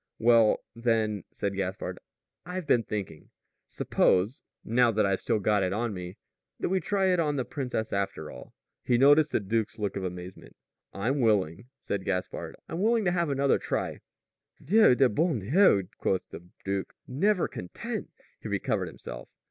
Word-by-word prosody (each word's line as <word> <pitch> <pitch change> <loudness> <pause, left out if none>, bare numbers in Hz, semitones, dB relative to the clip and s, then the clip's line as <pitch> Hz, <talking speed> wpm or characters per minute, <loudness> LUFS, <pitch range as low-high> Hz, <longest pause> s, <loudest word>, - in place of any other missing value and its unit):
"Well, 115 -1 +4
then," 110 -3 0
said 100 -1 -3
Gaspard, 95 0 -3 0.4
"I've 180 0 -5
been 125 -4 +4
thinking. 105 -4 -6 0.4
Suppose 100 +8 +1 0.2
now 120 +1 +4
that 105 -2 +2
I've 100 -1 +1
still 115 - 0
got 105 0 +2
it 95 0 0
on 115 +1 -1
me 90 0 -7 0.4
that - - -1
we 190 +1 +2
try 190 -1 +1
it 180 - +1
on 150 -3 +1
the 130 -3 -1
princess, 125 -5 -3
after 100 -6 -2
all." - - -12 0.3
He 120 - +2
noticed 145 +4 +5
the - - +2
duke's 110 +2 -2
look 105 -3 -2
of 95 - -3
amazement. 90 0 -7 0.4
"I'm 125 +8 -1
willing," 105 -2 +1
said 100 -2 -3
Gaspard. 90 -1 -3
"I'm 165 +3 -4
willing 225 0 +2
to 175 - +3
have 170 -3 0
another 140 0 +2
try - - -3 0.3
" - - -28
"Dieu 210 - +6
de 135 +1 +5
bon 155 +6 +1
Dieu!" 105 - +4
quoth 95 - -1
the 85 +1 -10 0.2
duke. 95 0 -3
"Never 185 +8 +1
content!" 90 - -6 0.3
He - - -7
recovered - - -1
himself. - - -9
115 Hz, 170 wpm, -28 LUFS, 100-145 Hz, 0.4 s, Dieu